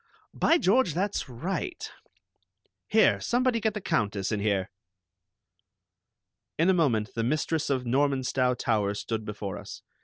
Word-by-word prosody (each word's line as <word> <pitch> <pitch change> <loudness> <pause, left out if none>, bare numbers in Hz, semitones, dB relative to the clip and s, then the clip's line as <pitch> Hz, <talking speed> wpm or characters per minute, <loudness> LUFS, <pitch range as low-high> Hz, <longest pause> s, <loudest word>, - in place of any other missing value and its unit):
"By 330 - +3
George, 205 - +2
that's 195 -5 -1
right! 185 - -4 1.0
Here, 220 0 +4
somebody, 245 -1 +1
get 220 -1 -1
the 210 - -3
Countess 105 - -1
in 105 - 0
here." 100 -2 0 1.9
In 170 +4 +4
a - - +3
moment 125 -10 +1
the 115 - -2
mistress 155 +4 0
of 130 -2 0
Normanstow 130 -1 +1
Towers 105 -4 0
stood 110 -1 -4
before 105 -2 -5
us. - - -10
135 Hz, 130 wpm, -27 LUFS, -, 1.9 s, Here